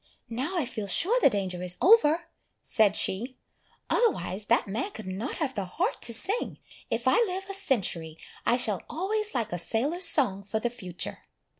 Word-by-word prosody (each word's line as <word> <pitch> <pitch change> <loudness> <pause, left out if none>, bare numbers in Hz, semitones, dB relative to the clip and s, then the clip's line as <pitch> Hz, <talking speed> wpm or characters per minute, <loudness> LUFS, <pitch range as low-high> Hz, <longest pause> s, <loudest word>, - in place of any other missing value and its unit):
"Now 275 +11 -2
I 320 - +1
feel 220 -4 -5
sure 385 - +4
the - - +6
danger 190 -5 -3
is 180 0 -3
over," 345 -5 +4 0.4
said 210 -3 +3
she, 240 +7 +1 0.5
"otherwise 215 - 0
that - - +2
man 220 - -3
could 220 - -9
not 190 +8 -4
have 290 -5 -2
the 200 -5 -3
heart 345 - -2
to - - +1
sing! 375 - 0 0.3
If - - -2
I - - +4
live 380 -1 -4
a 395 - -5
century, 185 - -1 0.3
I 240 - +2
shall 215 -7 +2
always 415 +3 -2
like 230 -7 -2
a 175 - -2
sailor's 275 - +2
song 200 -10 +3
for 210 +2 -3
the 240 +1 -2
future." 185 -8 -5
240 Hz, 180 wpm, -27 LUFS, -, 0.5 s, the